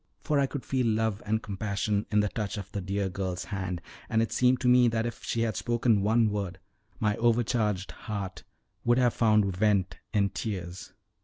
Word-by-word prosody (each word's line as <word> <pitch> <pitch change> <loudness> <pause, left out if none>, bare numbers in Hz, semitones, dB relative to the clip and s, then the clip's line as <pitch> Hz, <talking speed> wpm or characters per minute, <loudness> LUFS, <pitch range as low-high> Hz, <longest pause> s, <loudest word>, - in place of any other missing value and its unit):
For 150 -2 +2
I 140 - +3
could 140 -1 -6
feel 130 -3 +1
love 110 -1 0
and 110 +1 0
compassion 100 0 -1
in 105 -1 +3
the 105 - +1
touch 105 -1 -3
of 100 -1 -7
the 100 -1 -3
dear 100 +1 -1
girl's 90 -1 -3
hand, 90 -3 -4 0.3
and 110 - +2
it 115 - -3
seemed 125 0 +3
to 125 - +1
me 125 0 +6
that 115 0 0
if 120 - -5
she 115 - -1
had 110 -3 0
spoken 120 -2 +2
one 110 +1 +3
word, 100 -3 -3 0.4
my 105 -1 +1
overcharged 115 -4 +1
heart 95 -6 -6 0.4
would 120 +1 +3
have 125 -2 +3
found 105 -4 +3
vent 100 -1 +1
in 100 -2 +2
tears. 90 -4 -5
105 Hz, 190 wpm, -28 LUFS, 100-115 Hz, 0.4 s, me